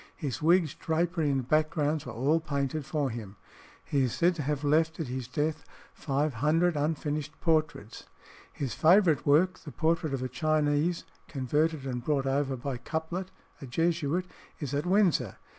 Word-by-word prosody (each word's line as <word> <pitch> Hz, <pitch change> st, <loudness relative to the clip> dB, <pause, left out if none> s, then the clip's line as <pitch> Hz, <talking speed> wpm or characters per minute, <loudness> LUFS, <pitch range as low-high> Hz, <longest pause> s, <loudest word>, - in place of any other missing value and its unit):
His 145 Hz, -7 st, -4 dB
wigs, 165 Hz, -1 st, +3 dB
drapery, 165 Hz, -1 st, 0 dB
and 135 Hz, -3 st, -1 dB
backgrounds 155 Hz, -1 st, +1 dB
were -, -, -5 dB
all 140 Hz, +8 st, +2 dB
painted 145 Hz, -1 st, -2 dB
for 145 Hz, -4 st, -1 dB
him. 110 Hz, -4 st, -7 dB, 0.5 s
He 140 Hz, -, +1 dB
is 125 Hz, -, -3 dB
said 175 Hz, +2 st, +3 dB
to 165 Hz, -, -5 dB
have 145 Hz, +1 st, -2 dB
left 160 Hz, +3 st, +2 dB
at 160 Hz, -, -1 dB
his 130 Hz, -1 st, -4 dB
death 150 Hz, +4 st, -2 dB, 0.3 s
500 150 Hz, +4 st, +1 dB
unfinished 150 Hz, 0 st, -2 dB
portraits. 155 Hz, -9 st, -1 dB, 0.4 s
His 135 Hz, -6 st, -4 dB
favourite 170 Hz, -, +4 dB
work, 170 Hz, +6 st, +4 dB
the 150 Hz, -, -10 dB
portrait 160 Hz, -2 st, 0 dB
of 130 Hz, -, -4 dB
a -, -, -1 dB
Chinese 155 Hz, +2 st, +1 dB, 0.2 s
converted 150 Hz, +2 st, 0 dB
and 125 Hz, -2 st, -3 dB
brought 140 Hz, -1 st, 0 dB
over 135 Hz, 0 st, 0 dB
by 130 Hz, +1 st, -4 dB
Couplet, 160 Hz, +8 st, -4 dB, 0.3 s
a 135 Hz, -, -7 dB
Jesuit, 165 Hz, +4 st, 0 dB, 0.3 s
is 145 Hz, -4 st, -4 dB
at 145 Hz, +4 st, -1 dB
Windsor. 180 Hz, -, +2 dB
150 Hz, 160 wpm, -29 LUFS, 135-160 Hz, 0.5 s, favourite